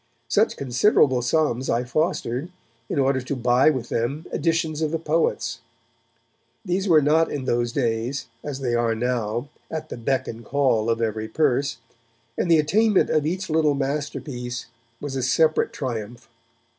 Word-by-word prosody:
Such - - +2
considerable 130 - +3
sums 130 -1 0
I 120 +1 +1
fostered 135 +1 -1 0.4
in - - -2
order 135 -1 +2
to 130 +3 -3
buy 125 +3 +4
with 130 -6 -2
them 135 +8 -2
editions 160 -1 0
of 155 - +1
the 165 - -1
poets. 160 +1 0 1.1
These 190 +2 -1
were 155 -3 +6
not 160 +3 +3
in 140 -3 -3
those 120 -1 0
days, 120 +1 -1 0.2
as 140 -2 -5
they 125 -3 -1
are 120 -1 +1
now, 120 +1 -1 0.2
at 155 -1 -5
the - - -6
beck 130 +3 -1
and 115 +1 -7
call 120 -4 +1
of 115 0 +1
every 110 0 -2
purse, 140 +2 +1 0.6
and - - -1
the 165 - +6
attainment 205 +7 +3
of 155 -1 +2
each 185 +3 -2
little 155 -2 +2
masterpiece 135 -3 -3 0.3
was 145 -2 -5
a 130 - -1
separate 155 +5 +2
triumph. 115 -3 -5
135 Hz, 155 wpm, -24 LUFS, 120-155 Hz, 1.1 s, were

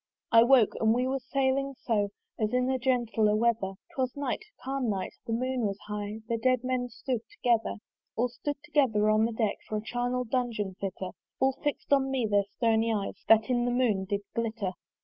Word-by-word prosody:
I 230 - +8
woke, 240 -3 +5
and 220 0 +3
we 250 +1 +1
were 270 +1 0
sailing 275 +1 0
on 210 -3 +2 0.3
As 215 -1 +1
in 250 +1 +2
a 260 - 0
gentle 235 -4 +2
weather: 225 -4 +1 0.2
'Twas 255 0 -2
night, 280 - -2 0.2
calm 265 -2 -1
night, 195 -3 -2
the - - -3
moon 250 0 0
was 195 -1 -3
high; 210 +1 -4
The 230 -1 -1
dead 255 +1 +2
men 255 -1 -1
stood 245 0 -3
together. 240 - +1 0.4
All 240 +2 +2
stood 290 +4 -4
together 255 -9 +3
on 215 +1 +4
the 230 - -1
deck, 220 -2 0
For 215 - -2
a 210 - -4
charnel 245 +2 -1
dungeon 230 -5 -1
fitter: 190 -1 -4 0.3
All 265 0 +4
fix'd 290 -1 0
on 270 -1 +3
me 265 -3 0
their 205 -2 +2
stony 225 -1 +2
eyes 205 -3 -3
That 225 +2 +5
in 240 -1 +2
the - - +1
moon 240 -6 +1
did 200 +1 -1
glitter. 220 -4 -2
235 Hz, 195 wpm, -29 LUFS, 215-255 Hz, 0.4 s, I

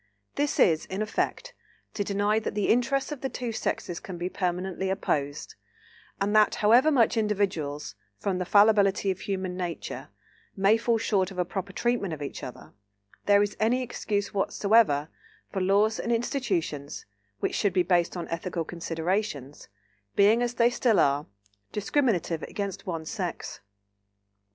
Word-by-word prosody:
This 290 0 -1
is, 160 -2 +4
in 195 +3 -2
effect, 365 - -2 0.4
to 205 - -1
deny 205 +2 +1
that 220 - -4
the 210 - 0
interests 255 +5 +2
of 295 - -5
the 265 - -2
two 245 -2 -4
sexes 175 -5 -3
can 190 -5 -8
be 175 +1 -3
permanently 185 +1 -2
opposed, 145 -7 -2 0.7
and 205 +2 0
that, 215 -1 +5
however 235 +8 +5
much 245 -6 +3
individuals, 190 -9 -1 0.2
from 190 - -2
the 180 - -2
fallibility 200 -1 +4
of 185 - -5
human 185 -2 -3
nature, 175 -2 -5 0.5
may 195 +3 +5
fall 230 0 +1
short 195 -4 +1
of 190 - -11
a 180 - +1
proper 195 +2 -5
treatment 230 -4 -1
of 145 - -7
each 140 - -6
other, 125 - -9 0.5
there 205 0 +6
is 205 - -3
any 245 +4 +2
excuse 205 -4 -2
whatever 200 -6 +3 0.4
for 190 - -2
laws 205 +4 +3
and 235 - -2
institutions, 200 - -2 0.3
which - - -1
should 200 - +1
be 180 - +3
based 175 0 +1
on 175 - -4
ethical 170 0 -3
considerations, 165 -3 -3 0.5
being, 210 +4 +5
as 245 0 -1
they 235 +1 +4
still 240 -3 +2
are, 140 +1 +2 0.4
discriminative 205 - 0
against 200 -2 -5
one 165 -3 -3
sex. - - -4
200 Hz, 155 wpm, -27 LUFS, 175-220 Hz, 0.7 s, there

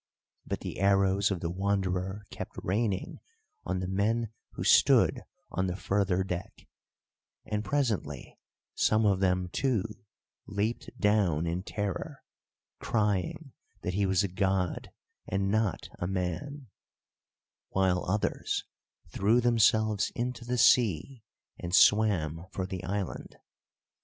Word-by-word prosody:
But - - -3
the - - -6
arrows 100 0 +3
of 95 -4 -2
the 85 -2 -2
Wanderer 95 +1 -1
kept - - -7
raining 100 0 -1 0.5
on 95 0 -1
the 90 - -3
men 110 +4 0 0.2
who - - -5
stood - - +5 0.3
on 95 0 0
the 90 - -2
further 95 -1 0
deck, 90 -2 -6 0.8
and 105 -1 -2
presently 125 -2 -2 0.3
some 110 0 +2
of 100 -2 +3
them, 90 -1 +1
too, 120 0 0 0.6
leaped 105 +3 -2
down 100 -7 +2
in 85 +2 -2
terror, 100 0 -4 0.6
crying 105 - -1 0.3
that 90 - -2
he 100 +1 +1
was 95 -1 +2
a - - +1
god 95 -1 -1 0.4
and 95 +1 0
not 110 -3 0
a 90 - -2
man, 100 - -4 1.0
while 95 -1 +1
others 105 +3 -1 0.5
threw 105 +8 +2
themselves 110 -3 +3
into 120 0 -3
the 125 +1 -2
sea, 115 - +3 0.4
and 90 +1 -1
swam 90 -7 +4
for 95 - -3
the 95 -1 -6
island. 95 -1 -4
100 Hz, 120 wpm, -29 LUFS, 90-110 Hz, 1.0 s, stood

